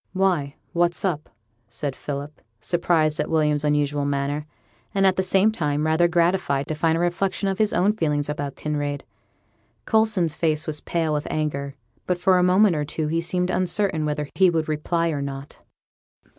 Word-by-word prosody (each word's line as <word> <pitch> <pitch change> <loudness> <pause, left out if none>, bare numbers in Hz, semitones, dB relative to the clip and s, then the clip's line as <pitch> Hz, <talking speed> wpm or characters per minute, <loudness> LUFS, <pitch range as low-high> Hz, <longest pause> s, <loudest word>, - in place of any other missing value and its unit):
'Why, 180 -7 +1 0.2
what's 175 +2 +1
up?' 155 -5 -2 0.4
said 130 +4 -4
Philip, 145 +1 -6 0.2
surprised 160 0 +1
at - - -1
William's 150 -2 +2
unusual 145 -1 +1
manner, 145 +1 -2 0.5
and, 195 0 +3
at 190 -1 +4
the 190 - +1
same 190 +3 +3
time, 150 -6 -1
rather 160 +2 +3
gratified 170 -5 +1
to - - 0
find 160 +1 +1
a - - -1
reflection 185 +3 0
of 195 +1 -2
his 215 -1 +3
own 195 +4 +2
feelings 150 -7 0
about 145 -2 -4
Kinraid. 145 -2 -3 0.8
Coulson's 220 -8 +2
face 155 -2 0
was 150 -1 -4
pale 165 -2 -1
with 150 0 -2
anger, 140 -2 -2 0.3
but 180 - +1
for 185 +1 +3
a - - +3
moment 185 +1 +4
or 150 - -1
two 150 +1 -3
he 165 +1 0
seemed 180 +2 -1
uncertain 185 -2 +1
whether 150 -1 -2
he 190 -1 +5
would 160 -2 -1
reply 165 +2 0
or 145 -2 -2
not. 140 0 -7
160 Hz, 175 wpm, -23 LUFS, 145-180 Hz, 0.8 s, he